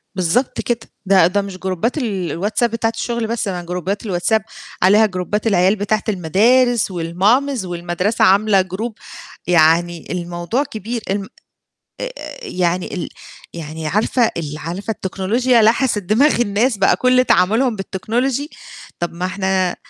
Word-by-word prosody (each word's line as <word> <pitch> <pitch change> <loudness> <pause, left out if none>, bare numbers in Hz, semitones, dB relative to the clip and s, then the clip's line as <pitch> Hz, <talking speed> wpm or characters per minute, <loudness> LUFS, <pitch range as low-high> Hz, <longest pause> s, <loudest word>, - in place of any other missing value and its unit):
بالضبط 185 +8 0
كده، 235 -1 -1 0.3
ده 190 -3 +5
ده 200 +3 0
مش 195 -2 -7
جروبات 190 - -2
ال 200 - -2
الواتساب 210 +6 0
بتاعة 225 0 0
الشغل 235 -1 -2
بس 230 -1 -2
أنا 180 -2 -3
جروبات 180 +4 -4
الواتساب 205 +3 +1 0.4
عليها 205 +4 +5
جروبات 205 +2 -2
العيال 190 -1 +3
بتاعة 210 +1 -1
المدارس 220 +6 +2
والماميز 195 +8 +1
والمدرسة 180 +6 0
عاملة 200 0 +4
جروب 205 +5 -5 0.5
يعني 170 0 +2
الموضوع 175 +8 -2
كبير 225 -2 -5
الم 195 0 -2 0.7
آآ - - -3 0.3
يعني 180 0 -1
ال 180 - -4 0.4
يعني 160 -1 -6
عارفة، 220 +6 +1
ال 150 -2 -4
عارفة 175 +8 -5
التكنولوجيا 220 +5 +1
لحسِت 225 -1 +2
دماغ 235 +8 +3
الناس 225 +2 +1
بقى 195 - +4
كل 255 0 +3
تعاملهم 225 +5 +2
بالTechnology 240 +9 -2 0.5
طَب 175 -1 -3
ما 175 +2 -3
إحنا 190 -1 0
200 Hz, 135 wpm, -19 LUFS, 180-230 Hz, 0.7 s, ده